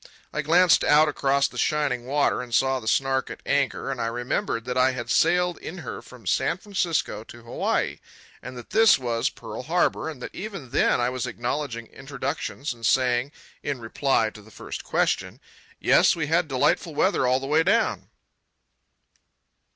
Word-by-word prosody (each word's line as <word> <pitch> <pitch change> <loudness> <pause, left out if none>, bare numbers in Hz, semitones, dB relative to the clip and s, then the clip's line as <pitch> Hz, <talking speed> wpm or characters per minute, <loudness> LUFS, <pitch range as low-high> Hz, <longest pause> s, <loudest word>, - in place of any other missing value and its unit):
I 150 - -1
glanced 175 +4 +4
out 150 +1 +5
across 140 -1 +1
the - - -8
shining 140 -5 0
water 140 -1 +1
and 120 -2 -3
saw 135 0 +2
the 110 - -10
Snark 135 +2 +1
at - - -8
anchor, 140 -1 0
and 130 - -4
I 115 - 0
remembered 120 - -2
that 125 0 -3
I 130 0 +3
had 120 -2 -5
sailed 180 -1 +2
in 180 - -7
her 115 - -6
from 125 -4 -15
San 170 - +1
Francisco 170 - -2
to 120 0 -13
Hawaii, 115 - -1 0.4
and 125 +1 -8
that 120 - -11
this 225 -1 +6
was 120 -3 -1
Pearl - - -8
Harbour, - - 0
and 150 -5 -8
that - - -8
even 195 - -7
then - - +2
I 120 0 +1
was 130 -2 -3
acknowledging 120 -1 -3
introductions 135 +1 -5
and 115 -1 -17
saying, 125 +2 +2 0.3
in 140 -3 -3
reply 115 -1 0
to 105 - -13
the 105 - -17
first - - -8
question, - - -1 0.4
"Yes, - - +4
we 160 -3 -2
had 165 +2 +1
delightful 145 +3 0
weather 165 -6 +2
all 130 +1 +3
the 135 - -6
way 150 +3 +3
down." 210 +7 +1
135 Hz, 175 wpm, -25 LUFS, 120-150 Hz, 0.4 s, this